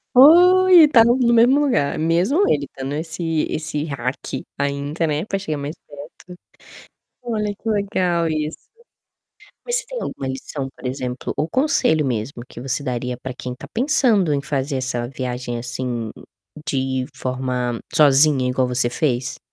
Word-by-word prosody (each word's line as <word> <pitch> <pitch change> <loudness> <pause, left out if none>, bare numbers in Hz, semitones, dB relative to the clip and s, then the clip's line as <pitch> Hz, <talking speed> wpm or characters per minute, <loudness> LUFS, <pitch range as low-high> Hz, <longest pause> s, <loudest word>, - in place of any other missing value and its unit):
Oi, 355 +5 +8
e - - +7
tá 235 -6 +6
no 240 +1 +4
mesmo 240 +2 +4
lugar, 245 - +1
mesmo 180 - +2
ele 145 -1 +1
estando 135 +1 -7
esse 160 0 -2
esse 150 -1 -3
hack 130 -3 -4 0.3
ainda, 140 +3 -2
né, 150 +5 -1
pra 195 -2 -2
chegar 155 -6 -4
mais 145 +3 -5
perto. 150 +5 -12 0.9
Olha 210 -4 -2
que 225 - -7
legal 185 -5 0
isso. 155 0 -3 1.1
Mas 480 0 +1
você - - +2
tem - - -6
alguma 135 - -5
lição, 135 +1 -5
por - - -8
exemplo, 125 -1 -4
ou 155 - -1
conselho 255 - +2
mesmo 120 +1 -3
que 120 - -10
você 135 +2 -1
daria 125 -1 -3
pra 125 0 -7
quem 125 -1 -6
tá - - -11
pensando 230 - +2
em 140 - 0
fazer 140 -1 -2
essa 125 -2 -2
viagem, 125 -2 -4
assim, 120 -2 -4 0.6
de 130 -1 -1
forma 125 -2 -3 0.2
sozinha 145 -3 +5
igual 125 0 +1
você 125 -1 +2
fez? 130 -4 -1
145 Hz, 155 wpm, -21 LUFS, 130-200 Hz, 1.1 s, Oi